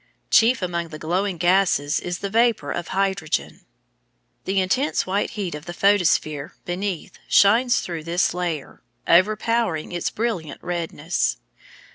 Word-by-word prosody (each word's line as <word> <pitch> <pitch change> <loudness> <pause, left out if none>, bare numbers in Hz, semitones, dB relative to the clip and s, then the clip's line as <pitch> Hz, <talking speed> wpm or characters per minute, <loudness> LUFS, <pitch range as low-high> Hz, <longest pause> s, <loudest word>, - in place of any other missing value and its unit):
Chief 230 -1 +4
among 170 -1 -2
the 155 -1 -9
glowing 180 +4 -1
gases 175 -4 +2
is 175 0 -4
the - - -2
vapour 225 -10 +2
of 175 - -4
hydrogen. 190 -4 -2 0.8
The 195 +1 +1
intense 255 +11 +1
white 195 +2 -1
heat 190 -4 -3
of 150 +1 -8
the 175 - -7
photosphere 170 -6 +2
beneath 180 -1 -4
shines 240 +5 +4
through 165 -3 -6
this 170 +1 +1
layer, 175 -5 -4 0.3
overpowering 215 -1 +2
its 175 -1 -2
brilliant 210 -10 -3
redness. 170 -1 -2
180 Hz, 130 wpm, -23 LUFS, 165-200 Hz, 0.8 s, Chief